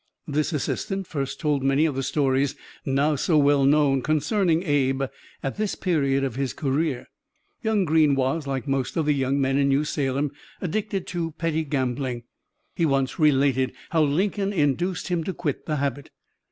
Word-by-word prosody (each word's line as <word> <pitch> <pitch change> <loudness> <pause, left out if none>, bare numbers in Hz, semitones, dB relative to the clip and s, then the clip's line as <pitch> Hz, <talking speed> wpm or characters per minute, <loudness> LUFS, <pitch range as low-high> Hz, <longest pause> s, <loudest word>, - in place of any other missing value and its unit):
This 150 +3 0
assistant 195 - -2
first 135 -4 -4
told 150 -3 +1
many 135 +3 +3
of 155 - 0
the 135 - -2
stories, 135 0 +1 0.3
now 140 +3 +1
so 155 +3 +2
well 140 -1 +4
known, 140 -2 +4
concerning 165 - +1
Abe 135 -4 +1 0.4
at 135 - -3
this 215 -1 -1
period 140 -7 +1
of 135 -3 -1
his 135 -1 -2
career: 140 -1 -1 0.6
Young 220 -4 +1
Greene 155 -3 +4
was, 135 +3 0
like 135 0 -3
most 135 +1 -1
of 160 - +1
the 150 - +3
young 135 0 0
men 135 0 +2
in 140 - +3
New 140 +2 +3
Salem, 140 -1 -1 0.3
addicted 200 +1 -2
to 165 -3 -3
petty 160 0 -1
gambling. 130 -3 -2 0.5
He 170 - 0
once 135 -2 +1
related 135 -4 +3 0.2
how 165 - +3
Lincoln 195 +7 +1
induced 175 +2 0
him 175 -2 0
to 190 - -3
quit 145 -6 -3
the 155 - 0
habit. 140 -1 -2
145 Hz, 170 wpm, -24 LUFS, 135-165 Hz, 0.6 s, well